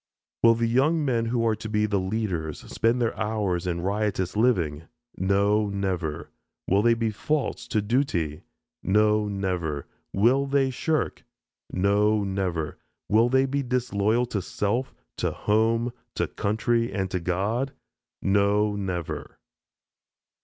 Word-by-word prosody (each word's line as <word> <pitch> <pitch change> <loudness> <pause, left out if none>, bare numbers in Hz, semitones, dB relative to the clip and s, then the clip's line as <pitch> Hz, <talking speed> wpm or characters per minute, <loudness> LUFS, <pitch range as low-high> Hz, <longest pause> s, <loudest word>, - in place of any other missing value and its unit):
Will 115 0 +6
the 115 0 0
young 145 +7 +2
men 120 -4 +1
who 115 0 0
are 110 -1 +2
to 110 - -7
be 105 0 +2
the 100 -2 +1
leaders, 95 -6 -2
spend 115 +2 0
their 115 -2 0
hours 95 -4 -1
in 85 -1 -1
riotous 100 -1 -1
living? 85 -10 +1 0.3
No, 100 +2 +2
never! 95 -6 -3 0.4
Will 100 +2 +3
they 115 +1 +4
be 115 -1 0
false 150 +7 -2
to 105 -2 0
duty? 100 - 0 0.4
No, 105 +1 +3
never! 90 -7 -2 0.3
Will 125 +7 +3
they 135 -1 +2
shirk? 155 +4 -1 0.5
No, 105 +2 +2
never! 95 -5 -2 0.3
Will 115 +3 +4
they 130 +1 +4
be 140 +1 -1
disloyal 120 -3 +1
to 105 -5 -3
self, 115 +8 -2 0.2
to - - 0
home, 115 +3 +1 0.2
to - - +1
country, 115 +3 0
and 95 -3 -2
to 90 - 0
God? 100 +10 -1 0.5
No, 100 +1 +2
never! 95 -5 -4
105 Hz, 135 wpm, -26 LUFS, 95-115 Hz, 0.5 s, Will